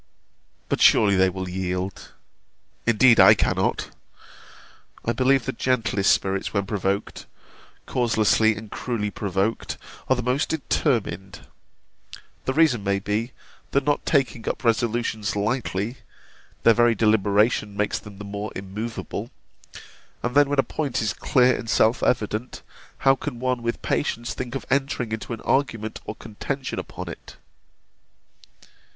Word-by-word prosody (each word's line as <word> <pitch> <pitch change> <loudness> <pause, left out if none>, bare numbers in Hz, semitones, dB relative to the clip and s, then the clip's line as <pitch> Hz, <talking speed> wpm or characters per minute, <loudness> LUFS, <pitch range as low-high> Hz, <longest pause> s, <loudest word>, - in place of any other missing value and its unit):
But - - -1
surely 100 -2 +6
they 95 0 +4
will 95 0 -5
yield 90 +1 -4 0.7
Indeed 115 +1 +5
I - - +9
cannot. - - 0 1.1
I 115 - +1
believe 130 +1 +2
the - - -1
gentlest 115 -5 +1
spirits 95 0 0
when 100 -1 +1
provoked 100 -1 -2 0.6
(causelessly 110 -2 +2
and 110 -1 -9
cruelly 110 -5 -3
provoked) 100 +2 -2 0.3
are 130 - +5
the 125 - -3
most 125 +4 0
determined. 120 - -1 1.0
The 130 - 0
reason 140 -8 +3
may 100 0 +1
be, 105 +5 -2 0.4
that 140 - +1
not 145 +1 0
taking 130 -6 0
up - - -4
resolutions 115 -2 0
lightly 110 +1 -1 0.7
their 115 - +7
very 120 0 +4
deliberation 105 0 +2
makes 105 0 0
them 100 -2 -12
the 105 - -8
more 100 +1 -5
immovable. 105 +4 -5 0.9
And 120 - -1
then 145 0 +5
when 145 - 0
a 135 - +5
point 140 -5 -2
is 105 -4 0
clear 125 -2 +3
and 115 - -6
self 115 +1 +3
evident, 110 0 -1 0.4
how 135 - +7
can 135 -2 -6
one 125 -1 -1
with 115 0 -3
patience 120 -4 -1
think 125 0 -5
of 135 - -4
entering 135 -4 0
into 110 +2 -5
an 115 - -5
argument 115 -6 -1
or 105 - -5
contention 130 +5 -5
upon - - -7
it? - - -9
115 Hz, 135 wpm, -24 LUFS, 105-125 Hz, 1.1 s, I